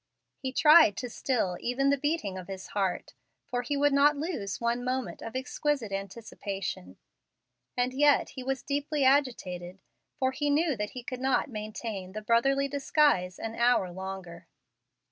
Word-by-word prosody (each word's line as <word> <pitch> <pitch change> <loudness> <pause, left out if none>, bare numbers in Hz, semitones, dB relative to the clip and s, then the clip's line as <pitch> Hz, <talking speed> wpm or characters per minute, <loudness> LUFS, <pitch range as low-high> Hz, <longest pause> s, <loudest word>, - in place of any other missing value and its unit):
He 260 -1 -3
tried 300 - +6
to 245 -2 -4
still 215 -10 -1
even 275 +3 +1
the - - +4
beating 290 - -1
of 185 -1 -7
his 190 -1 -7
heart, 195 -3 -2 0.3
for 245 0 -2
he 280 +4 -2
would 290 0 +3
not 285 +1 +5
lose 280 - -3
one 235 +1 0
moment 255 +1 -3
of 225 - -7
exquisite 260 -2 -1
anticipation. 195 - -5 0.8
And 250 +1 +1
yet 290 +2 +4
he 260 - -8
was 265 0 -3
deeply 285 0 -1
agitated, 195 -10 +1 0.4
for 260 0 +1
he 290 +2 -1
knew 300 0 +2
that 210 -1 -3
he 250 - -5
could 255 +1 -6
not 265 +2 +1
maintain 215 -3 -5
the 215 0 -6
brotherly 270 +5 +3
disguise 275 - +2
an 225 0 -5
hour 235 -6 +2
longer. 185 -2 -7
245 Hz, 160 wpm, -29 LUFS, 195-280 Hz, 0.8 s, tried